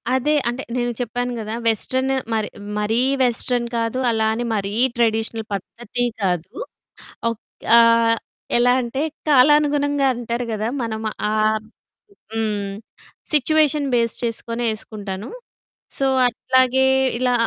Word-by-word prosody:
అదే. 275 +4 +1 0.2
అంటే 245 +3 -4
నేను 240 -1 0
చెప్పాను 245 +1 -2
గదా! 215 0 -5
వెస్టర్న్ 260 +4 0 0.2
మరి 215 -1 0 0.3
మరీ 220 +3 +1 0.2
వెస్టర్న్ 245 0 0
కాదు. 230 +2 -1
అలా 220 -1 +1
అని 240 +2 -2
మరీ 200 0 -2 0.2
ట్రెడిషనల్ 225 -1 0
పద్ధతీ 235 +5 -4 0.2
కాదు. 180 -3 0 0.8
ఒక్ 230 - -7 0.3
ఆహ్, 230 0 +5 0.4
ఎలా 245 +1 +4
అంటే 250 +4 -3 0.3
కాలానుగుణంగా 290 0 +4
అంటారు 240 0 -3
గదా! 215 +1 -2
మన 230 -1 -3 0.4
ఆబ్ 215 0 +1 0.6
హ్మ్. 210 -3 -2 0.6
సిట్యుయేషన్ 300 0 +3
బేస్ 230 -2 +2
చేసుకొని 230 0 -3
ఏసుకుంటాను. 205 -2 -6 0.7
సో, 275 - +1 0.2
అట్లాగే 260 +2 +2 0.3
ఇలా 250 0 +1
235 Hz, 115 wpm, -21 LUFS, 220-255 Hz, 0.8 s, ఆహ్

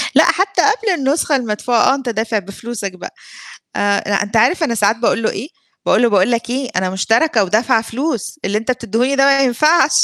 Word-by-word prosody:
لأ، - - +7
حتّى 385 -1 +1
قبل 430 +1 +1
النسخة 285 0 0
المدفوعة، 235 +1 +1
آه، - - +2
أنت 270 -3 -5
دافع 220 -1 -1
بفلوسك 200 +1 -7
بقى. 185 - -10 0.6
آآ 200 0 +1
لأ، 200 -1 +1
أنت 205 +2 -4
عارف 250 +11 +3
أنا 255 -7 0
ساعات 210 +1 +1
باقول 230 0 0
له 220 - 0
إيه، 240 +8 -6 0.4
باقول - - +3
له: 240 - +4
"باقول 200 +3 +2
لك، 235 0 -2
إيه 260 0 -3
أنا 185 0 0
مشتركة 225 +5 +1
ودافعة 220 +3 +1
فلوس، 255 +4 -4
اللي 205 +2 0
أنت 225 +3 -3
بتدّيهوني 250 +3 -1
ده 270 - +4
ما 275 0 +4
ينفعش" 300 +7 +3
235 Hz, 205 wpm, -17 LUFS, 210-275 Hz, 0.6 s, لأ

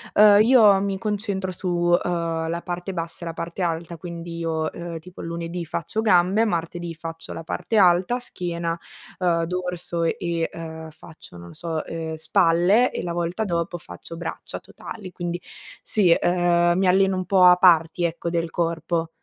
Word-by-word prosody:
Uhm, 205 -1 +8
io 215 -5 +6
mi 195 -1 -1
concentro 200 -2 -2
su, 185 +1 -6
uhm, 175 -2 0
la 170 +1 -2
parte 175 +2 -4
bassa 170 -1 -5
e - - -5
la 165 - -4
parte 170 +3 -6
alta, 170 0 -2
quindi 170 0 -7
io, 160 -1 -1
ehm, 170 -1 -6
tipo 180 +3 -11
lunedì 170 +1 -4
faccio 170 +7 -3
gambe, 195 +1 +4
martedì 170 -2 -3
faccio 165 0 -8
la 165 - -7
parte 220 +6 -2
alta, 185 +5 +4
schiena, 170 -7 -3 0.4
ehm, 170 -2 +2
dorso 180 -1 -3
e, 170 0 -1
uhm, 160 -1 -8
faccio, 155 - -14
non 85 0 -11
lo - - -12
so, 165 -2 -4
ehm, 160 -1 -5
spalle, 175 +8 +3
e - - -4
la 175 - -3
volta 175 +5 -2
dopo 170 -1 -2
faccio 165 0 -10
braccia 170 - -6
totali. 190 -4 -10
Quindi, 175 0 -4 0.4
sì, 200 -5 +2
ehm, 175 0 +3
mi 190 - +2
alleno 190 +1 +4
un 185 - -2
po' 190 0 +4
a 180 0 +8
parti, 170 -1 +4
ecco, 170 0 -3
del 165 -1 -1
corpo. 165 0 -1
175 Hz, 170 wpm, -23 LUFS, 165-185 Hz, 0.4 s, Uhm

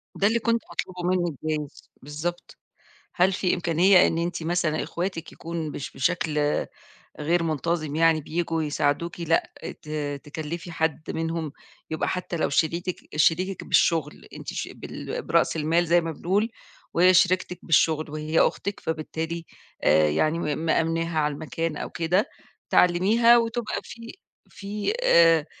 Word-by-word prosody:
ده 200 - +3
اللي 230 +2 +2
كنت 230 0 +1
باطلُبه 180 -1 -5
منِك 175 -3 +1
جايز 155 -2 -4
بالضبط. 160 +5 -5 0.6
هل 190 0 +4
في 185 -1 +1
إمكانية 175 +2 +4
إن 165 - -1
أنتِ 170 0 -2
مثلًا 165 -2 0
إخواتِك 170 -1 -4
يكون 165 -2 -5
مش 140 - -6
بشكل 155 +1 0 0.8
غير 170 +3 +1
منتظم 155 -1 -1
يعني 165 -1 +4
بييجوا 165 +1 -2
يساعدوكِ، 150 +3 -1
لأ 165 0 +1 0.3
ت - - -15 0.4
تكلّفي 160 +3 -6
حد 160 -1 -2
منهُم 165 -2 -3 0.4
يبقى 160 - -1
حتى 180 -1 -3
لو 160 - +1
شريكِك 170 +5 0 0.2
شريكِك 180 +5 +2
بالشغل، 160 -3 +1
أنتِ - - -10
ش - - -3
بال - - -6
برأس - - +1
المال 165 +3 +1
زي 170 +1 +4
ما 165 -1 -4
بنقول، 200 +8 0 0.4
وهي 180 +2 +5
شريكتِك 185 0 +2
بالشغل 155 -2 +2
وهي 155 +2 0
أختِك، 200 - 0
فبالتالي 160 +1 -4 0.4
آآ 75 +1 +5
يعني 155 - +1
م 150 -4 -2
مأمناها 165 0 0
على 150 -1 +1
المكان 160 +1 -3
أو - - -5
كده، 175 +5 +1 0.4
تعلّميها 215 +7 +5
وتبقى 230 -1 -2
في 230 0 -10 0.4
في 205 - -3
آآ، 165 - +5
165 Hz, 140 wpm, -25 LUFS, 155-180 Hz, 0.8 s, وهي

